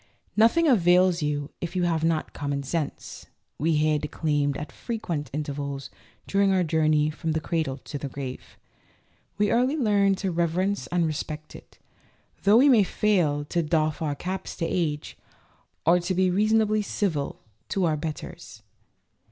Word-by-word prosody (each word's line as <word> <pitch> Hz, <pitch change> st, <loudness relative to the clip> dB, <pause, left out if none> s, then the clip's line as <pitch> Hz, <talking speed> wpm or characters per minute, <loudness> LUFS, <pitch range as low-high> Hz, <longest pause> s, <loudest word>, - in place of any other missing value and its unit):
"Nothing 230 Hz, +10 st, +4 dB
avails 180 Hz, -, +4 dB
you 145 Hz, -1 st, -2 dB
if 175 Hz, +1 st, -4 dB
you 180 Hz, -, +1 dB
have 165 Hz, -2 st, +1 dB
not 165 Hz, -1 st, 0 dB
common 140 Hz, -1 st, -3 dB
sense," 145 Hz, +1 st, -4 dB, 0.3 s
we 160 Hz, +2 st, +2 dB
hear 155 Hz, 0 st, +2 dB
declaimed 145 Hz, -2 st, -1 dB
at 150 Hz, -, -6 dB
frequent 175 Hz, -, -4 dB
intervals 140 Hz, -1 st, -4 dB, 0.3 s
during 200 Hz, 0 st, +2 dB
our 185 Hz, -1 st, +3 dB
journey 155 Hz, -2 st, +2 dB
from 160 Hz, +1 st, -3 dB
the 160 Hz, -, 0 dB
cradle 155 Hz, -4 st, -2 dB
to 145 Hz, +1 st, -7 dB
the 140 Hz, -, -5 dB
grave. 130 Hz, -1 st, -7 dB, 0.8 s
We 205 Hz, 0 st, +2 dB
early 255 Hz, +6 st, +2 dB
learn 200 Hz, -6 st, +3 dB
to 190 Hz, 0 st, -2 dB
reverence 175 Hz, +4 st, 0 dB
and 175 Hz, -1 st, +1 dB
respect 155 Hz, 0 st, -5 dB
it, -, -, -14 dB, 0.6 s
though 205 Hz, +3 st, +5 dB
we 270 Hz, +4 st, +6 dB
may 240 Hz, -7 st, +6 dB
fail 175 Hz, -8 st, +1 dB
to 170 Hz, +3 st, 0 dB
doff 155 Hz, -1 st, 0 dB
our 150 Hz, -3 st, -1 dB
caps 185 Hz, +4 st, -5 dB
to 170 Hz, -, -2 dB
age, 155 Hz, -4 st, -2 dB, 0.7 s
or 175 Hz, +2 st, +5 dB
to 180 Hz, +2 st, -2 dB
be 185 Hz, 0 st, +3 dB
reason 215 Hz, +4 st, +3 dB
ably 215 Hz, 0 st, +1 dB
civil 175 Hz, -8 st, -2 dB, 0.3 s
to 195 Hz, -3 st, +1 dB
our 160 Hz, -2 st, +2 dB
betters. 150 Hz, -7 st, -7 dB
165 Hz, 160 wpm, -26 LUFS, 150-195 Hz, 0.8 s, we